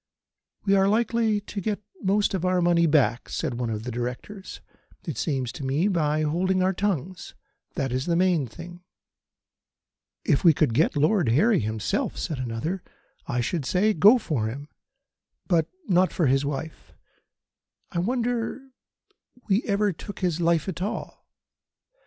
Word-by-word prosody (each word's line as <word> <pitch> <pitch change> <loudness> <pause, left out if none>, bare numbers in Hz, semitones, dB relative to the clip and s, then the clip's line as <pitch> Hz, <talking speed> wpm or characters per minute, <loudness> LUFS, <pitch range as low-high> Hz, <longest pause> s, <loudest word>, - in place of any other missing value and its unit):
"We 200 - +3
are 195 0 +4
likely 225 0 +1
to 205 0 -6
get 210 +1 -2 0.2
most 200 +2 +1
of 185 -3 -2
our 185 0 +2
money 170 -1 +3
back," 130 -6 +2
said - - -2
one 120 -2 -1
of 110 -1 -3
the 125 - -4
Directors, 125 - -6 0.5
"it 160 - -4
seems 130 -2 -2
to - - -8
me, 140 +8 +1
by 155 -5 +1
holding 185 +5 +1
our 190 +1 +2
tongues. 185 -2 -3 0.4
That 135 -6 -1
is 130 +4 -2
the 170 - +2
main 175 -6 +2
thing." 175 +7 -11 1.4
"If 140 - +2
we 165 -4 +6
could 150 -7 +2
get 155 +7 +2
Lord 155 - +3
Harry 195 - +4
himself," 110 -1 -2
said 150 -5 -3
another, 130 +10 -3 0.5
"I 125 - 0
should 155 +6 -2
say: 195 +10 +2
Go 210 +8 +7
for 150 - -2
him, 140 +6 -7 0.8
but 170 -4 +2 0.2
not 185 0 +3
for 170 - 0
his 135 +1 +3
wife. 145 +2 -5 1.0
I 170 - -1
wonder 245 +5 -2 0.8
we 200 +3 +3
ever 205 -2 +1
took 200 +6 -9
his 175 -2 0
life 165 -1 +2
at 180 -2 -4
all. 200 - -5
170 Hz, 155 wpm, -25 LUFS, 140-195 Hz, 1.4 s, Go